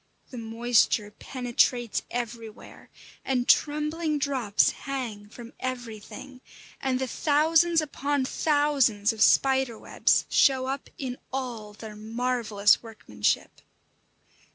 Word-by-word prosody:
The 255 Hz, -, -8 dB
moisture 225 Hz, -2 st, +1 dB
penetrates 245 Hz, 0 st, 0 dB
everywhere, 230 Hz, -2 st, -7 dB, 0.3 s
and 250 Hz, -2 st, -1 dB
trembling 300 Hz, +1 st, +1 dB
drops 260 Hz, -8 st, +1 dB
hang 235 Hz, -7 st, -6 dB
from 235 Hz, +1 st, -12 dB
everything; 245 Hz, +1 st, -7 dB, 0.4 s
and 265 Hz, -1 st, 0 dB
the 260 Hz, -, -1 dB
thousands 320 Hz, +5 st, +3 dB
upon 285 Hz, -2 st, -2 dB
thousands 275 Hz, -9 st, +2 dB
of 220 Hz, -, -8 dB
spiders' 265 Hz, -2 st, +3 dB
webs -, -, +1 dB
show 260 Hz, -2 st, +3 dB
up 270 Hz, +1 st, -4 dB
in 255 Hz, -2 st, -5 dB
all 240 Hz, -6 st, -5 dB
their 215 Hz, 0 st, -10 dB
marvellous 220 Hz, -2 st, +1 dB
workmanship. 210 Hz, -, -3 dB
250 Hz, 105 wpm, -26 LUFS, 225-275 Hz, 0.4 s, thousands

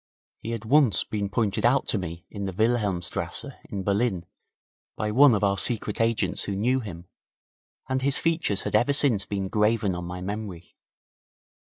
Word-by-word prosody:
He 115 Hz, -, -7 dB
had 115 Hz, -1 st, -4 dB
once 130 Hz, -5 st, +4 dB
been 100 Hz, -2 st, -3 dB
pointed 105 Hz, -2 st, -1 dB
out 125 Hz, +3 st, +3 dB
to 105 Hz, -, +1 dB
me 85 Hz, -1 st, -7 dB
in 100 Hz, -2 st, -5 dB
the 95 Hz, -, -4 dB
Wilhelmstrasse 100 Hz, -4 st, -1 dB, 0.2 s
in 100 Hz, -2 st, -5 dB
Berlin 100 Hz, -3 st, 0 dB, 0.7 s
by 105 Hz, 0 st, -2 dB
one 130 Hz, +1 st, +6 dB
of 105 Hz, -, -1 dB
our 100 Hz, -1 st, +2 dB
secret 110 Hz, -2 st, -1 dB
agents 115 Hz, -1 st, 0 dB
who 100 Hz, -, -3 dB
knew 125 Hz, +6 st, +1 dB
him, 90 Hz, -7 st, -8 dB, 0.8 s
and 130 Hz, 0 st, -1 dB
his 140 Hz, +1 st, +2 dB
features 165 Hz, -, 0 dB
had -, -, -4 dB
ever 120 Hz, +6 st, +3 dB
since 120 Hz, -9 st, +3 dB
been 100 Hz, -1 st, -2 dB
graven 105 Hz, -1 st, +1 dB
on 90 Hz, 0 st, -5 dB
my 90 Hz, +1 st, -6 dB
memory. 95 Hz, -2 st, -6 dB
105 Hz, 170 wpm, -26 LUFS, 95-120 Hz, 0.8 s, one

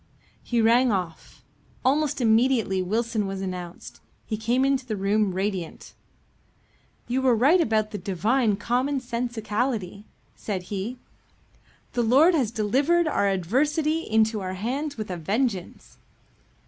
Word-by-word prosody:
He 240 Hz, -1 st, 0 dB
rang 240 Hz, +2 st, +4 dB
off. 180 Hz, -5 st, -5 dB, 0.4 s
Almost 285 Hz, +1 st, +1 dB
immediately 225 Hz, -4 st, +2 dB
Wilson 220 Hz, +2 st, -1 dB
was 195 Hz, 0 st, -4 dB
announced. 180 Hz, -2 st, -7 dB, 0.3 s
He 220 Hz, -, -3 dB
came 235 Hz, +5 st, +1 dB
into 275 Hz, -1 st, +1 dB
the 230 Hz, -4 st, -4 dB
room 200 Hz, +1 st, +1 dB
radiant. 190 Hz, -3 st, -4 dB, 1.1 s
"You 255 Hz, +2 st, 0 dB
were 255 Hz, -2 st, +4 dB
right 290 Hz, +11 st, +4 dB
about 215 Hz, -6 st, 0 dB
the 205 Hz, -, -5 dB
divine 210 Hz, +5 st, +1 dB
common 250 Hz, +7 st, 0 dB
sensicality," 235 Hz, -4 st, -3 dB, 0.3 s
said 195 Hz, -4 st, -4 dB
he. 205 Hz, +6 st, -4 dB, 1.0 s
"The 240 Hz, -, +1 dB
Lord 270 Hz, +10 st, +5 dB
has 270 Hz, -9 st, +1 dB
delivered 275 Hz, +11 st, +1 dB
our 200 Hz, -9 st, +1 dB
adversary 290 Hz, -, +1 dB
into 220 Hz, -6 st, +1 dB
our 185 Hz, 0 st, -4 dB
hands 270 Hz, +9 st, -3 dB
with 215 Hz, -3 st, -5 dB
a 180 Hz, -, -3 dB
vengeance." 200 Hz, -, -3 dB
225 Hz, 130 wpm, -25 LUFS, 200-260 Hz, 1.1 s, Lord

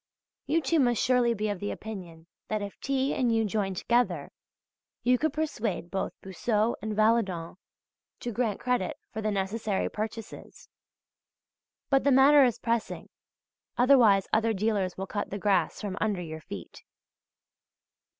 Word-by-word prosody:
You, 330 Hz, +2 st, +2 dB
too, 320 Hz, +4 st, +2 dB
must 245 Hz, -4 st, +3 dB
surely 245 Hz, -2 st, +3 dB
be 215 Hz, 0 st, -2 dB
of 200 Hz, -3 st, -3 dB
the 205 Hz, -, -3 dB
opinion 180 Hz, -7 st, -8 dB, 0.2 s
that 215 Hz, -1 st, -2 dB
if 200 Hz, -, -8 dB
T. 275 Hz, 0 st, 0 dB
and 245 Hz, -3 st, +1 dB
you 225 Hz, -1 st, +2 dB
join 200 Hz, -2 st, -1 dB
together 240 Hz, +6 st, 0 dB, 0.7 s
you 250 Hz, 0 st, +3 dB
could 315 Hz, 0 st, +1 dB
persuade 230 Hz, -, -3 dB
both 195 Hz, -, -2 dB
Boussod 210 Hz, +4 st, 0 dB
and 215 Hz, +1 st, -3 dB
Valadon 205 Hz, -7 st, +1 dB, 0.6 s
to 240 Hz, -, -3 dB
grant 225 Hz, -2 st, -1 dB
credit 250 Hz, +4 st, -1 dB, 0.2 s
for 220 Hz, -, -3 dB
the 215 Hz, -, 0 dB
necessary 200 Hz, +1 st, -1 dB
purchases. 220 Hz, +1 st, -7 dB, 1.2 s
But 270 Hz, -1 st, +4 dB
the 280 Hz, -, +3 dB
matter 275 Hz, +2 st, +7 dB
is 245 Hz, -3 st, +2 dB
pressing, 230 Hz, -1 st, -2 dB, 0.7 s
otherwise 240 Hz, -7 st, +5 dB
other 225 Hz, 0 st, +3 dB
dealers 200 Hz, -3 st, -1 dB
will 190 Hz, -, -3 dB
cut 205 Hz, +1 st, -4 dB
the 200 Hz, -, -4 dB
grass 205 Hz, -1 st, +1 dB
from 200 Hz, -2 st, -4 dB
under 205 Hz, -4 st, 0 dB
your 160 Hz, -1 st, -7 dB
feet. 95 Hz, -, -9 dB
220 Hz, 150 wpm, -28 LUFS, 195-245 Hz, 1.2 s, matter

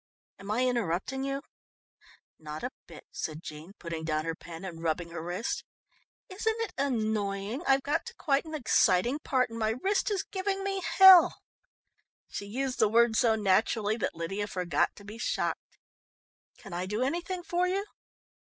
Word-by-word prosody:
"Am 195 Hz, +1 st, -10 dB
I 235 Hz, +4 st, +2 dB
interrupting 240 Hz, +2 st, -1 dB
you?" 275 Hz, 0 st, -2 dB, 1.0 s
"Not 155 Hz, 0 st, -7 dB
a 250 Hz, -, -2 dB, 0.2 s
bit," -, -, -12 dB
said 155 Hz, +1 st, -5 dB
Jean, 155 Hz, +5 st, -9 dB
putting 170 Hz, -4 st, -6 dB
down 155 Hz, -1 st, -1 dB
her 165 Hz, -, -1 dB
pen 170 Hz, +2 st, -9 dB
and 165 Hz, -3 st, -7 dB
rubbing 170 Hz, +1 st, -1 dB
her 170 Hz, -, -5 dB
wrist. 175 Hz, +6 st, -3 dB, 0.6 s
"Isn't 445 Hz, +4 st, -1 dB
it 430 Hz, -5 st, -3 dB
annoying. 215 Hz, -3 st, -1 dB
I've 270 Hz, 0 st, +4 dB
got 290 Hz, +10 st, -1 dB
to 470 Hz, -, -8 dB
quite 280 Hz, -, +1 dB
an 315 Hz, -1 st, -6 dB
exciting 240 Hz, -1 st, +3 dB
part, 255 Hz, -5 st, 0 dB
and 230 Hz, -, -6 dB
my 220 Hz, -1 st, +1 dB
wrist 400 Hz, +4 st, +2 dB
is 400 Hz, -2 st, 0 dB
giving 390 Hz, 0 st, -2 dB
me 390 Hz, -1 st, -1 dB
hell." 380 Hz, -2 st, +8 dB, 0.9 s
She 200 Hz, -, -6 dB
used 260 Hz, +4 st, -3 dB
the 215 Hz, -, +4 dB
word 230 Hz, +1 st, +4 dB
so 225 Hz, -1 st, +4 dB
naturally 210 Hz, +1 st, +2 dB
that 205 Hz, -, -2 dB
Lydia 195 Hz, +5 st, -3 dB
forgot 180 Hz, -3 st, 0 dB
to 205 Hz, -, -13 dB
be 210 Hz, +3 st, -9 dB
shocked. -, -, -2 dB, 0.8 s
"Can 195 Hz, -5 st, -11 dB
I 180 Hz, +2 st, -3 dB
do 210 Hz, +5 st, -1 dB
anything 345 Hz, +6 st, -2 dB
for 355 Hz, +1 st, 0 dB
you?" 390 Hz, +2 st, -1 dB
225 Hz, 170 wpm, -29 LUFS, 180-290 Hz, 1.0 s, hell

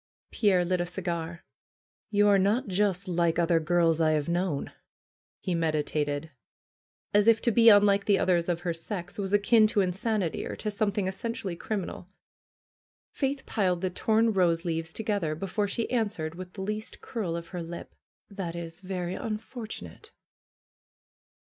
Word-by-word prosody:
Pierre 190 Hz, -5 st, +3 dB
lit 180 Hz, 0 st, +1 dB
a 175 Hz, -, -2 dB
cigar. 170 Hz, -2 st, -4 dB, 0.6 s
"You 205 Hz, 0 st, +3 dB
are 200 Hz, -1 st, +5 dB
not 205 Hz, +6 st, +2 dB
just 195 Hz, -1 st, 0 dB
like 170 Hz, -2 st, +1 dB
other 170 Hz, -1 st, +3 dB
girls 165 Hz, 0 st, +2 dB
I 155 Hz, -1 st, +4 dB
have 150 Hz, -2 st, 0 dB
known," 170 Hz, -4 st, -1 dB, 0.7 s
he 185 Hz, -, -2 dB
meditated, 155 Hz, -2 st, -1 dB, 0.8 s
as 205 Hz, +1 st, +4 dB
if 225 Hz, -1 st, +6 dB
to 235 Hz, -, +3 dB
be 230 Hz, +1 st, +7 dB
unlike 205 Hz, -1 st, +5 dB
the 200 Hz, -2 st, +4 dB
others 175 Hz, -2 st, +2 dB
of 175 Hz, -1 st, 0 dB
her 175 Hz, -2 st, -1 dB
sex 180 Hz, +3 st, -6 dB
was 195 Hz, -1 st, -2 dB
akin 215 Hz, +2 st, +5 dB
to 210 Hz, -1 st, +2 dB
insanity 190 Hz, 0 st, -1 dB
or -, -, -5 dB
to 210 Hz, -, -3 dB
something 205 Hz, -1 st, 0 dB
essentially 195 Hz, -2 st, -4 dB
crim 200 Hz, +1 st, -3 dB
inal. 180 Hz, -, -8 dB, 1.0 s
Faith 275 Hz, -1 st, -2 dB
piled 185 Hz, -5 st, 0 dB
the 185 Hz, -1 st, -1 dB
torn 220 Hz, +4 st, +2 dB
rose 170 Hz, -3 st, +2 dB
leaves 165 Hz, -1 st, -2 dB
together 200 Hz, -7 st, -1 dB
before 195 Hz, +4 st, -1 dB
she 230 Hz, +3 st, -2 dB
answered 205 Hz, -10 st, -1 dB
with 180 Hz, +1 st, -9 dB
the 195 Hz, -, -7 dB
least 215 Hz, +3 st, -4 dB
curl 205 Hz, -9 st, -3 dB
of 170 Hz, 0 st, -6 dB
her 180 Hz, -2 st, -5 dB
lip: 170 Hz, +1 st, -8 dB, 0.3 s
"That 190 Hz, -5 st, -5 dB
is 170 Hz, 0 st, -7 dB
very 185 Hz, -2 st, -4 dB
unfortunate 215 Hz, -, -6 dB
185 Hz, 160 wpm, -28 LUFS, 170-210 Hz, 1.0 s, be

